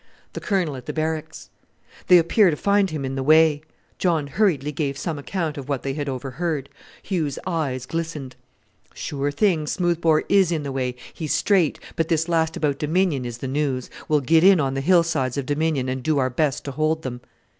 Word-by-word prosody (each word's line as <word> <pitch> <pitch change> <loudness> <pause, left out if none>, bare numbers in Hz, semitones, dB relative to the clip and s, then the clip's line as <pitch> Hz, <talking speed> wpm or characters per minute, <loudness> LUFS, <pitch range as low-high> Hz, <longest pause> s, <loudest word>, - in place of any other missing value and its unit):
"The - - -5
Colonel 180 -8 -1
at 125 - -10
the - - -3
Barracks." 160 0 -4 0.6
"They 180 - +8
appear 175 +4 +4
to 155 - 0
find 200 +4 +2
him 150 -4 -4
in 130 - -3
the 135 - -2
way." 155 +1 +5 0.4
John 165 -5 +1
hurriedly 150 -3 +1
gave 140 -2 -2
some 155 -1 -3
account 160 -1 -3
of 140 +1 -9
what 140 -3 -2
they 135 - -2
had 145 0 -3
overheard. 140 +3 -3 0.3
Hugh's 160 -8 -2
eyes 145 -8 -2
glistened. 155 -5 -5 0.6
"Sure 145 -1 -3
thing! 155 0 +1
Smoothbore 170 -3 +1
is 195 -3 +4
in 160 -3 -1
the 140 - -4
way. 130 -2 -2 0.2
He's 155 -3 -2
straight; 185 -7 +2 0.2
but 165 -2 0
this 160 -1 +1
last 165 -1 0
about 145 -2 -1
Dominion 155 -4 +1
is 120 -1 -5
the 135 - -5
news. 135 -2 -2 0.2
We'll 150 -1 +2
get 160 +5 +4
in 190 -2 +7
on 135 -2 0
the 135 - -2
hillsides 160 -6 +2
of 140 - -2
Dominion, 145 -2 0
and 130 0 -3
do 155 +3 +1
our 130 -2 +1
best 145 +1 0
to 140 - -5
hold 155 +3 0
them." 125 -2 -5
155 Hz, 200 wpm, -23 LUFS, 135-165 Hz, 0.6 s, They